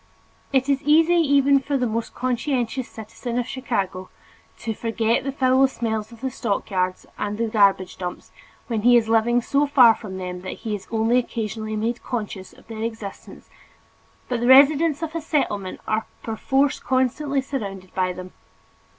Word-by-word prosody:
It 265 -1 +2
is 275 -1 +1
easy 320 +4 +4
for 310 - 0
even 280 -1 +4 0.2
the 250 - +1
most 230 0 -3
conscientious 250 -1 -1
citizen 235 +2 -6
of 245 - 0
Chicago 195 -8 -3 0.5
to 225 - -4
forget 230 +1 0
the 275 - -2
foul 265 0 +3
smells 220 -3 -3
of 230 - -14
the 265 -1 -2
stockyards 190 -5 -2
and 205 0 -2
the 230 - 0
garbage 200 -4 +2
dumps, 180 -1 -6 0.3
when 225 -3 -2
he 245 +2 +6
is 225 -2 +1
living 230 +2 +3
so 285 +3 +1
far 250 -5 +7
from 195 -4 -8
them 180 -1 -5
that 185 - -7
he 220 - -1
is 205 -2 -6
only 225 +2 +2
occasionally 220 -2 -4
made 230 +3 -2
conscious 210 -6 -5
of - - -19
their 220 -1 -7
existence 225 -3 -7 0.8
but 245 -2 -1
the 240 - 0
residents 290 +4 +6
of 320 -1 -4
a 330 - -3
Settlement 205 - -2
are 215 0 -1 0.2
perforce 270 +5 0
constantly 265 +2 0
surrounded 200 -9 -5
by 185 -1 0
them. 185 0 -9
230 Hz, 170 wpm, -23 LUFS, 210-265 Hz, 0.8 s, far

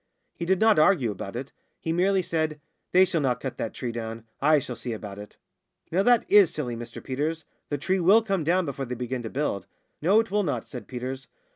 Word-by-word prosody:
He 170 - -5
did 190 +1 +2
not 220 -5 +5
argue 155 - +4
about 100 +1 -7
it. 130 +3 -5 0.3
He 165 - -2
merely 190 +2 +2
said, 155 -2 -1 0.3
"They 185 +1 +6
shall 170 -3 0
not 125 -3 +1
cut 130 - -5
that 115 - -2
tree 125 -2 -3
down. 115 -1 -5 0.2
I 155 +2 +5
shall 125 -3 -3
see 115 +1 -5
about 105 -2 -7
it." 105 - -11 0.5
"Now 180 +4 +3
that 240 +2 +4
is 200 -5 +6
silly, 130 -7 -3
Mr 120 0 -8
Peters. 150 +4 -2 0.2
The 145 - -1
tree 185 +7 0
will 200 +6 +5
come 195 -6 0
down 180 +4 +2
before 140 -2 -4
they 125 0 -4
begin 125 +1 -3
to 115 - -5
build." 115 -9 -2 0.3
"No, 190 +8 +5
it 225 -2 -1
will 210 +1 +2
not," 160 -8 -2
said 125 -5 -8
Peters. 130 +1 -5
150 Hz, 225 wpm, -26 LUFS, 125-185 Hz, 0.5 s, They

